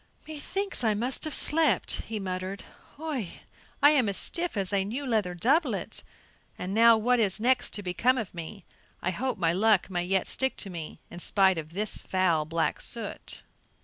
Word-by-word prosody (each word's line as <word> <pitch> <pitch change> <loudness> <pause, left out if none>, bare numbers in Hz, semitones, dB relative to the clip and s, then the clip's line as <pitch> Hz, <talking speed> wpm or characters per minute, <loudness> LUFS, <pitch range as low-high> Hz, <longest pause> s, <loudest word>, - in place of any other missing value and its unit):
"Methinks 315 +3 -3
I 220 -2 +2
must 245 +8 -2
have 310 - -3
slept," 320 +1 +1
he 220 -1 -4
muttered. 185 0 -4 0.3
"Hui, 285 - -4 0.5
I 290 - +8
am 260 -8 +3
as 195 - -2
stiff 345 - +1
as 195 0 -1
a 195 -1 +2
new 245 +8 -4
leather 215 -8 0
doublet, 270 - +1 0.6
and 185 +2 -4
now, 230 +1 +6
what 245 +3 +2 0.2
next 245 +2 +2
is - - +1
to 205 - -6
become 235 +8 +1
of 225 -6 -4
me? 175 +3 -8 0.4
I 185 - +1
hope 255 +8 -2
my 165 -3 +1
luck 200 0 +2
may 175 -1 -1
yet 190 +1 +1
stick 265 0 +3
to 195 - -3
me, 165 -3 -7
in 175 - -8
spite 190 -1 +2
of 155 +1 -9
this 210 +3 -1
foul 175 -5 +1
black 165 +1 -1
soot!" - - -3
205 Hz, 180 wpm, -28 LUFS, 185-255 Hz, 0.6 s, I